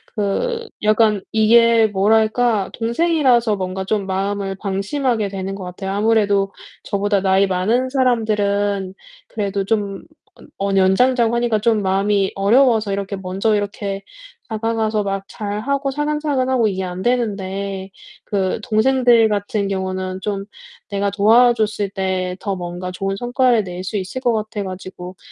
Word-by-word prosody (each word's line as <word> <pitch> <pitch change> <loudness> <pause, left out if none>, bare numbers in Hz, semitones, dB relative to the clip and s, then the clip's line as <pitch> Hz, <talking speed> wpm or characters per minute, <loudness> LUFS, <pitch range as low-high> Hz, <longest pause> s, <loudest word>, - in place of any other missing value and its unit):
그 455 - -1 0.2
약간 215 -1 +3
이게 230 +1 +5
뭐랄까? 215 +1 +2
동생이라서 240 -2 +2
뭔가 190 0 -4
좀 205 0 -1
마음을 195 +1 -2
방심하게 205 +4 -1
되는 195 0 -4
것 195 - -7
같아요. 185 +2 -5
아무래도 205 -1 +2 0.3
저보다 200 -1 0
나이 190 +1 +3
많은 215 +8 0
사람들은 205 -6 0 0.3
그래도 200 -2 -2
좀 200 -2 -2 0.3
언 - - -16
언 195 0 0
연장자고 235 +5 +3
하니까 235 -2 +1
좀 220 0 +2
마음이 195 +1 +1
어려워서 220 0 +3
이렇게 200 0 -3
먼저 190 +3 0
이렇게 200 -1 -3 0.4
다가가서 220 -1 -1
막 195 -1 -3
잘하고 255 +7 -2
사근사근하고 280 -5 0
이게 190 -1 -3
안 180 0 -5
되는데 200 -4 -2 0.3
그 195 -2 -1
동생들 240 0 +4
같은 205 0 -1
경우는 190 -1 -3
좀 200 -1 -3 0.4
내가 200 0 0
도와줬을 215 0 +3
때 185 -2 -2
더 200 -1 -3
뭔가 180 0 -5
좋은 195 +2 -3
성과를 245 -2 +2
낼 180 0 -6
수 200 +3 -3
있을 195 +7 -5
것 245 -2 +2
같아 215 -1 -3
가지고 185 -1 -8
205 Hz, 305 characters per minute, -19 LUFS, 195-230 Hz, 0.4 s, 이게